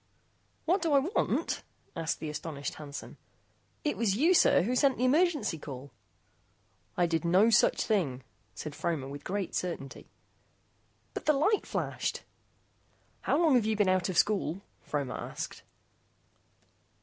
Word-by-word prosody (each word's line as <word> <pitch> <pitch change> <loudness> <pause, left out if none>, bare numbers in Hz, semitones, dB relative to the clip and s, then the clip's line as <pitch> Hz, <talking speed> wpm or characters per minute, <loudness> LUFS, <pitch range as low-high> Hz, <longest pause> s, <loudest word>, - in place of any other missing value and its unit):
"What 365 +5 +2
do 325 -3 +1
I - - +7
want?" 320 +10 0 0.3
asked 165 -2 -2
the 155 - -4
astonished 150 -1 -5
Hansen. 145 -2 -8 0.7
"It 295 - -1
was 205 -4 +1
you, 325 +8 +5
sir, 255 - +5
who 245 +6 0
sent 270 0 +3
the 250 - +1
emergency 290 - +2
call." 140 -2 -8 1.1
"I 175 - +4
did 165 0 0
no 185 +7 +4
such 225 - +4
thing," 145 - 0 0.3
said 150 - -6
Fromer 155 -3 -2
with 145 +1 -8
great 195 +1 -3
certainty. 165 -7 -4 1.0
"But - - -6
the 305 - +6
light 360 +10 +2
flashed - - -2 0.5
" - - -38
"How - - +3
long 325 -4 +4
have 240 -4 +4
you 220 - +1
been 205 -2 +2
out 185 0 +2
of 185 - -2
school?" 195 -3 +1 0.2
Fromer 145 -3 -3
asked. - - -6
190 Hz, 150 wpm, -30 LUFS, -, 1.1 s, I